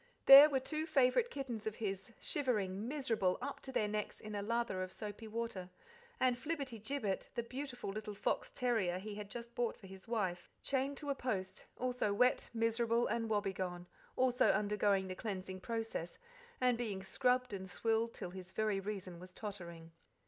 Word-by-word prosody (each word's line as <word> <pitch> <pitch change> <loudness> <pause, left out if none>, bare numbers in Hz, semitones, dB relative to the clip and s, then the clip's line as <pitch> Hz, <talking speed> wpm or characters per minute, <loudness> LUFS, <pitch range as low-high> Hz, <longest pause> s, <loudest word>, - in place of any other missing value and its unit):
There 275 +2 +12
were 270 -2 +2
two 310 +4 -2
favourite 300 - +4
kittens 240 - -4
of 215 - -2
his, 195 -1 -3
shivering, 215 -7 0
miserable, 235 -10 +1
up 285 - -4
to 265 - -6
their 215 -5 +1
necks 210 0 -3
in 215 0 -7
a 205 - -1
lather 230 -2 0
of 185 0 -4
soapy 210 +2 -7
water; 220 -5 -4 0.5
and 255 -1 +4
Flibberty 265 -3 -4
Gibbet, 220 -3 -2
the 235 - 0
beautiful 250 -3 -5
little 210 0 -5
fox 200 - 0
terrier 220 -8 +1
he 205 +3 -6
had 205 -1 -6
just 235 +1 -7
bought 240 -2 -1
for 200 - -14
his 190 +2 -11
wife, 190 -7 -1
chained 275 +1 0
to 290 -2 -2
a - - +3
post, 190 -8 -3
also 250 -5 0
wet, 250 +4 +3
miserable, 230 +1 +2
and 230 0 -1
woebegone, 190 -4 -1 0.3
also 255 0 +4
undergoing 205 -1 +2
the 185 - -3
cleansing 185 -2 -4
process, 225 -5 -3 0.4
and 250 -2 +3
being 205 -5 -2
scrubbed 250 +3 +1
and 190 -1 -5
swilled 225 +4 0
till 180 - -5
his 185 0 -9
very 215 -2 +1
reason 190 -3 -5
was 185 +1 -12
tottering. 170 -6 -7
220 Hz, 175 wpm, -36 LUFS, 195-250 Hz, 0.5 s, There